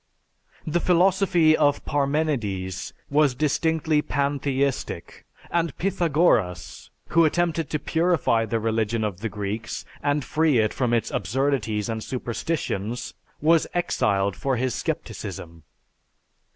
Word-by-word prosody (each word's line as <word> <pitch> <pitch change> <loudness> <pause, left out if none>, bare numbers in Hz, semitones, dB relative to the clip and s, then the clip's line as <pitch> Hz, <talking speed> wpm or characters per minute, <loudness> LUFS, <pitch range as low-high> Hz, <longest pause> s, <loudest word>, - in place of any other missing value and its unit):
The 160 +2 0
philosophy 180 -2 +4
of 145 -2 +2
Parmenides 135 - -1 0.2
was 145 -3 +3
distinctly 155 +2 +1
pantheistic, 140 -2 -2 0.2
and 170 -3 0
Pythagoras, 160 - +1 0.2
who 170 - +4
attempted 165 0 +1
to 150 - 0
purify 160 -9 +1
the 115 +1 0
religion 110 0 0
of 100 -4 -3
the 115 +1 -3
Greeks 105 +2 -4 0.2
and 145 -1 0
free 155 -4 +2
it 110 -1 +2
from 125 -3 0
its 115 -2 0
absurdities 110 0 0
and 110 -1 -3
superstitions, 120 - -3 0.3
was 160 +1 +4
exiled 100 - +1
for 135 -1 -1
his 130 0 0
scepticism. 85 -1 -5
140 Hz, 110 wpm, -24 LUFS, 110-160 Hz, 0.3 s, philosophy